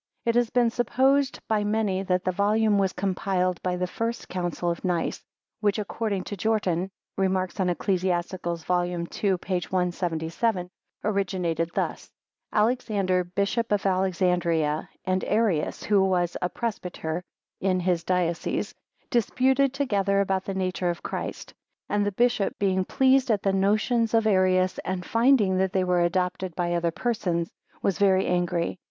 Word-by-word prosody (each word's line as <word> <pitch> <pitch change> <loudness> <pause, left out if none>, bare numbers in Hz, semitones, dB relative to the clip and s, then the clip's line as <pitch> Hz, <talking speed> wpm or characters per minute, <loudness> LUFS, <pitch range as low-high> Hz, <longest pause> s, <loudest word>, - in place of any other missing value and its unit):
It 230 - +2
has 240 -1 +2
been 240 -1 +2
supposed 265 +4 +2
by 215 -1 +1
many 205 -2 0
that 185 -1 0
the 185 - +1
volume 210 +2 +2
was 190 -1 +2
compiled 185 -1 -1
by 180 -1 -1
the 180 0 -1
first 230 +5 -4
Council 175 -1 -2
of 170 - -6
Nice, 175 -3 -1 0.4
which, 205 -1 +1
according 210 -2 -2
to 205 - -5
Jortin 190 -3 0 0.3
(Rem. 190 -1 +2
on 185 0 0
Eccl. 180 -1 -1
vol. 180 -1 +2
ii. 180 +2 -1
p. 185 +2 -5 0.2
177), 180 +2 -1 0.3
originated 180 -5 0
thus: - - -2 0.4
Alexander, 210 -5 +1
Bishop 200 +6 -1
of 205 -1 +1
Alexandria, 175 -5 +1 0.2
and 185 0 0
Arius, 210 -8 0
who 205 -2 +3
was 180 -2 +1
a 180 - 0
presbyter 180 -7 -4 0.4
in 185 -1 +1
his 175 -1 0
diocese, 170 -2 -1 0.4
disputed 260 +4 +2
together 200 -8 +1
about 190 -1 0
the 195 - -4
nature 185 -1 -1
of 170 - -4
Christ; - - -5 0.3
and 205 0 +1
the 205 - 0
bishop 235 0 +1
being 190 -2 +1
displeased 265 +2 +3
at 210 -3 +1
the 195 - +2
notions 215 +4 +2
of 225 -1 +3
Arius, 185 -2 +3
and 185 -1 -4
finding 230 -6 +3
that 190 -1 +1
they 190 - +2
were 180 -1 +2
adopted 180 0 -1
by 175 -1 -1
other 170 0 +1
persons, 175 -4 -2 0.3
"was 195 +1 0
very 190 -1 +4
angry." 175 0 0
190 Hz, 150 wpm, -26 LUFS, 180-210 Hz, 0.4 s, very